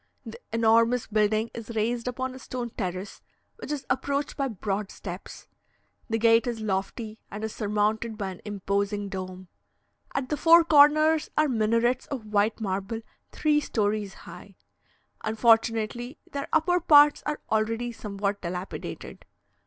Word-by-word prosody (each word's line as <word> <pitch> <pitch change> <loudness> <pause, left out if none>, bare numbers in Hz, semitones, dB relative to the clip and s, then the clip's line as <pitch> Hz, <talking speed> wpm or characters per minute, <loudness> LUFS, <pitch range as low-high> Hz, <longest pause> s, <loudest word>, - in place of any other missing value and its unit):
The 470 - -9
enormous 230 +1 +3
building 215 +1 +1
is 230 0 -7
raised 230 +2 -1
upon 255 +1 -3
a 260 - -10
stone 245 -2 -5
terrace, 185 -1 -5 0.4
which 455 - -7
is 295 -2 -3
approached 280 +2 -1
by 275 -1 -1
broad 205 -2 -3
steps; 180 -1 -9 0.6
the 225 - +1
gate 230 +2 +4
is 235 -2 -2
lofty, 215 +2 -3
and 210 +2 -7
is 220 - -3
surmounted 215 +1 -1
by 195 -3 -3
an 185 - -11
imposing 200 0 -2
dome. 185 -1 -6 0.7
At 265 -2 -2
the 300 - -1
four 335 +2 +7
corners 310 0 +5
are 305 0 +4
minarets 230 +1 +1
of 260 -6 -5
white 210 +1 +1
marble 200 +2 -3 0.3
three 300 -1 +2
stories 210 -6 -1
high; - - -12 0.7
unfortunately, 225 +3 +1
their 280 0 -4
upper 355 +3 +3
parts 295 -3 +6
are 300 0 -2
already 225 +2 0
somewhat 200 -2 -3
dilapidated. 180 +2 -6
225 Hz, 140 wpm, -27 LUFS, 205-260 Hz, 0.7 s, four